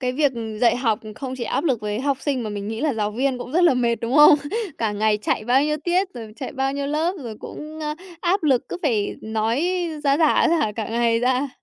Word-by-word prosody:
Cái 250 -1 -1
việc, 285 0 +2
ừ, 220 -2 -5
dạy 240 -1 +4
học 230 -4 +1 0.2
không 260 +2 -5
chỉ 240 - -4
áp 275 - -1
lực 260 -9 +1
với 210 +1 -3
học 275 0 0
sinh 270 -5 -1
mà 215 - -4
mình 205 0 -5
nghĩ 225 +2 -4
là 300 -4 0
giáo 210 -1 -1
viên 255 +3 -1
cũng 245 +1 -7
rất 350 +3 +4
là 315 -7 +5
mệt, 235 -1 +2
đúng 230 +3 -3
không? 300 0 +9 0.4
Cả 220 -2 0
ngày 210 0 +1
chạy 215 - -1
bao 255 +4 +3
nhiêu 300 0 0
tiết, 360 +2 +1
rồi 225 -3 -8
chạy 265 - -6
bao 270 0 -1
nhiêu 280 0 -3
lớp 315 +5 0
rồi 220 -2 -6
cũng, 310 +1 -8
ơ, 300 0 -2 0.3
áp 365 +1 +1
lực 270 -5 +2
cứ - - -4
phải 225 -10 0
nói 220 +5 -1 0.4
ra 280 0 +4
rả, 315 +1 +4
ra 335 - +3
rả 215 -8 0
cả 215 0 -4
ngày 230 0 +2
ra. 255 +3 +1
250 Hz, 260 wpm, -22 LUFS, 225-290 Hz, 0.4 s, không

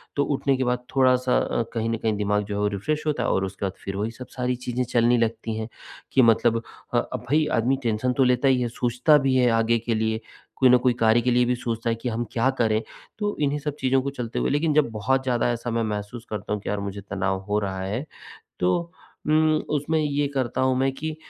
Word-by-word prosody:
तो 145 - +2
उठने 140 -1 +1
के 130 - 0
बाद, 125 0 -1
थोड़ा-सा 130 -1 +3
अ, 115 - 0
कहीं 115 0 -1
न 115 - 0
कहीं 110 -1 -1
दिमाग़ 105 0 +1
जो 100 0 -5
है - - -2
वो 105 - +2
रिफ्रेश 150 +9 -2
होता 135 -6 0
है - - 0
और 95 - +1
उसके 100 +1 -5
बाद 95 - -2
फिर 95 0 -4
वही 105 +3 -2
सब, 125 +2 -10
सारी 125 0 0
चीज़ें 125 0 -2
चलने 120 0 +2
लगती 115 -1 -1
हैं 110 0 -3 0.4
कि 130 - +5
मतलब 115 0 +3 0.3
अ, - - +3 0.2
अब - - -5
भई 155 +1 +3
आदमी 130 +4 +2
टेंशन 115 +3 0
तो 135 - +3
लेता 125 +2 +3
ही 130 -2 +3
हैं। 120 - 0
सोचता 125 +6 +3
भी 135 -2 +1
हैं 125 -2 +4
आगे 115 +1 +2
के 115 0 -1
लिए, 110 0 0 0.4
कोई 130 -1 +6
ना 125 - +7
कोई 125 -1 +4
कार्य 115 +1 +4
के 125 +1 +1
लिए 125 0 +4
भी 125 +1 +1
सोचता 115 -1 -3
है, 115 - +1
कि 120 +2 -4
हम 115 +1 -2
क्या 125 +3 +2
करें? 110 -1 +2 0.4
तो 205 0 -1
इन्हीं 145 0 +1
सब 150 0 -4
चीज़ों 130 0 +2
को 140 - -2
चलते 120 -4 -4
हुए - - 0
लेकिन 150 +2 +1
जब 150 -5 +3
बहुत 130 +5 0
ज़्यादा 120 -2 +1
ऐसा 120 0 -3
मैं 115 0 0
महसूस 105 +2 -4
करता 105 -1 -4
हूँ 105 - -3
कि - - -5
यार 105 - -1
मुझे 100 0 -5
तनाव 95 -1 -1
हो 105 +1 +2
रहा 95 -2 -3
है, 105 +10 -3 0.5
तो 170 - 0 0.4
उम्, 155 0 +4 0.2
उसमें 155 +3 0
ये 145 -1 0
करता 130 -2 -1
हूँ 130 0 +2
मैं 135 0 +2
कि 155 +2 -5
120 Hz, 250 wpm, -24 LUFS, 110-135 Hz, 0.5 s, ना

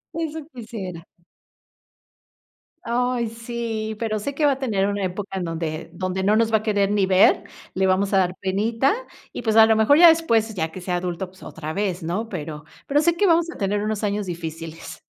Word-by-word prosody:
eso 320 -1 -3
quisiera. 200 -8 -7 1.8
Ay, 245 0 0
sí, 230 -1 -4
pero 215 -2 -1
sé 280 +7 -4
que 300 +1 +1
va 280 - +5
a 265 - -8
tener 205 -7 0
una 200 -1 -2
época 190 +1 -4
en 185 - -2
donde 165 -1 -4
donde 185 0 -3
no 210 +2 +3
nos 225 0 +2
va - - +7
a 215 - -7
querer 205 -2 +1
ni 205 -2 +2
ver, 190 +1 +5 0.3
le 190 0 +1
vamos 195 +2 +1
a 195 - +5
dar 180 -1 +1
penita, 225 - +1 0.4
y - - -5
pues, 220 -2 0
a 225 0 +9
lo 220 0 +4
mejor, 220 +7 +5
ya 340 0 +9
después, 230 -10 +2
ya 160 -4 -2
que 185 - -8
sea 180 -1 -1
adulto, 175 +1 -3
pues 185 +1 -20
otra 155 0 -6
vez, 190 -3 -2
¿no? 195 +8 -3
Pero 150 -5 -6 0.2
pero 290 +1 +3
sé 340 +1 +2
que 405 - +3
vamos 335 -1 +3
a - - -8
tener 205 +1 0
unos 215 0 -2
años 205 0 -1
difíciles. 165 -2 -7
205 Hz, 205 wpm, -23 LUFS, 185-230 Hz, 1.8 s, a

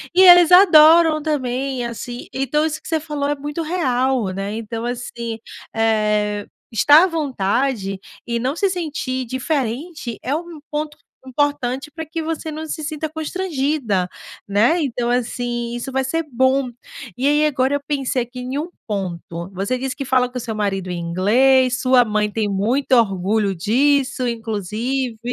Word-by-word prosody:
e 370 - +6
eles 355 -2 +8
adoram 325 -3 +7
também, 265 -3 -2
assim. 240 +1 -6
Então, 275 +3 0
isso 310 -1 -3
que - - -12
você 320 -1 0
falou 295 -2 -3
é 290 - 0
muito 295 +3 -5
real, 265 - 0
né. 195 +2 -4
Então, 225 +1 -5
assim, 235 -2 -5 0.4
eh, 210 -2 +1 0.3
estar 290 - +6
à - - +4
vontade 250 - -1 0.3
e 235 0 -2
não 260 +5 -1
se 395 +2 +1
sentir 295 -8 -3
diferente 260 +1 -3
é 275 - -1
um 335 -1 -6
ponto 300 0 -3 0.3
importante 275 0 -1
pra 320 0 -6
que 325 +1 -4
você 320 0 -4
não 310 +1 -5
se 310 0 -5
sinta 310 +1 -3
constrangida, 295 - -1 0.4
né. 215 - +3
Então 245 -4 -1
assim, 240 -1 -2
isso 240 +3 -5
vai 265 0 0
ser 330 +5 -1
bom. 260 +2 +2 0.5
E 265 - +1
aí, 295 +1 +3
agora 265 -2 +1
eu 285 - -2
pensei 275 -3 -1
aqui 245 +1 -10
em 255 +2 -4
um 315 +4 -3 0.2
ponto, 175 -3 -4
você 200 +7 -1
disse 260 0 -3
que 275 -1 -5
fala 255 -1 +2
com 250 - -7
o - - -1
seu 220 -2 -4
marido 195 -3 -2
em 180 - -3
inglês. 245 +9 +3
Sua 255 -2 +5
mãe 210 -1 0
tem 220 -1 -1
muito 230 +8 0
orgulho 200 -2 +2
disso 260 +7 +1
inclusive, 230 +2 -3
255 Hz, 165 wpm, -20 LUFS, 225-295 Hz, 0.5 s, eles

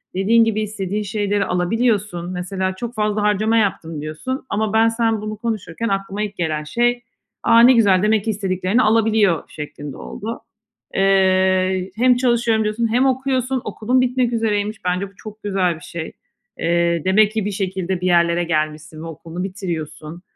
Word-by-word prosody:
dediğin 225 +5 +4
gibi 215 -1 0
istediğin 210 -1 -3
şeyleri 205 0 -1
alabiliyorsun. 185 -1 0
Mesela, 185 +1 -3
"Çok 235 +4 -6
fazla 210 0 0
harcama 210 +2 +2
yaptım" 165 -7 -1
diyorsun 160 - -5
ama 215 +1 -1
ben, 225 +1 +5
sen 225 -1 0
bunu 215 0 -5
konuşurken 225 -2 -3
aklıma 195 +1 -2
ilk 205 -1 -6
gelen 155 -3 -1
şey, 240 +9 0 0.4
"A, 230 - +5
ne 245 +2 +8
güzel, 200 -5 +4
demek 215 -1 +2
ki - - -1
istediklerini 195 +2 0
alabiliyor" 215 -6 +2
şeklinde 150 -1 -8
oldu. 225 +3 -6 0.5
Eee, 190 -1 +2
hem 250 +2 +4
"çalışıyorum" 235 -3 +2
diyorsun 215 +2 0
hem 255 +2 +3
okuyorsun, 260 -1 0
okulun 235 +5 0
bitmek 250 -1 +1
üzereymiş. 215 -2 -1
Bence 180 +2 -1
bu - - -24
çok 215 0 -11
güzel 190 -4 0
bir 160 - -14
şey. 170 -1 -6 0.5
Eee, 170 0 +1
demek 205 +3 +4
ki 220 -2 -2
bir 205 - -1
şekilde, 190 -2 -3
bir 180 - 0
yerlere 170 0 +3
gelmişsin 155 -1 -2
ve - - -6
okulunu 165 +3 -7
bitiriyorsun. 170 -4 -6
205 Hz, 160 wpm, -20 LUFS, 180-225 Hz, 0.5 s, ne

